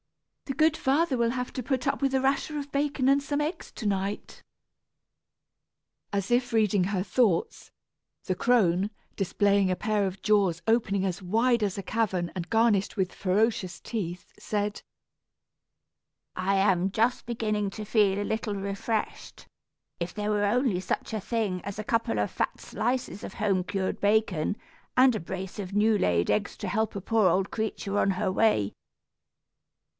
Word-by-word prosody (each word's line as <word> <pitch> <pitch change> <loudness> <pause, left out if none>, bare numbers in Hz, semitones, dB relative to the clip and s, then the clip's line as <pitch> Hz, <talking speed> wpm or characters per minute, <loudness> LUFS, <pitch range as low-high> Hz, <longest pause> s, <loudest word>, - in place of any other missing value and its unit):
"The 270 - -4
good 315 0 +4
father 280 +1 +1
will 235 -1 +2
have 250 +1 -3
to 255 - -4
put 260 0 -1
up 275 +1 0
with 270 -1 +1
a 265 - +3
rasher 275 +3 0
of 285 -1 -5
bacon 280 -2 0
and 275 +1 +4
some 285 +1 -1
eggs, 300 +4 -3
to 220 - -7
night." 200 0 -2 1.7
As 200 -2 -2
if 245 +1 +2
reading 210 -4 +3
her 190 -1 -1
thoughts, 210 -6 0 0.5
the 185 - 0
crone, 195 -3 +2 0.3
displaying 200 0 +2
a - - +1
pair 210 -2 0
of 190 +1 -7
jaws 195 -5 +2
opening 205 -4 +2
as 185 0 -2
wide 230 +5 +2
as 200 -2 -1
a 200 - -4
cavern 190 -7 -1
and 175 -2 -4
garnished 225 -3 +2
with 185 -2 0
ferocious 190 -2 0
teeth, 180 -6 -5
said: 205 0 -2 1.5
"I 190 +2 +1
am 190 -1 +2
just 230 +5 +1
beginning 215 -3 -1
to 215 +1 -7
feel 205 -2 +3
a - - -2
little 220 -1 -2
refreshed. 200 +3 -4 0.5
If 170 +1 -3
there 210 0 -2
were 205 -1 +2
only 225 -2 +1
such 205 - -3
a 215 - -2
thing 205 -5 -1
as 200 -1 -6
a - - -2
couple 225 - 0
of 105 - 0
fat - - -2
slices 240 -3 -2
of - - -7
home 195 -3 +1
cured 190 +1 -3
bacon, 205 -4 +1 0.4
and 255 -1 +6
a - - -1
brace 190 +4 -6
of 195 -1 -5
new 210 +1 +3
laid 85 - +1
eggs 205 -1 0
to 205 - -5
help 215 +3 -1
a 200 - -3
poor 215 -1 +3
old 190 +3 +1
creature 205 -2 -2
on 195 - +3
her 190 +1 -1
way." 185 - +2
210 Hz, 170 wpm, -27 LUFS, 190-230 Hz, 1.7 s, and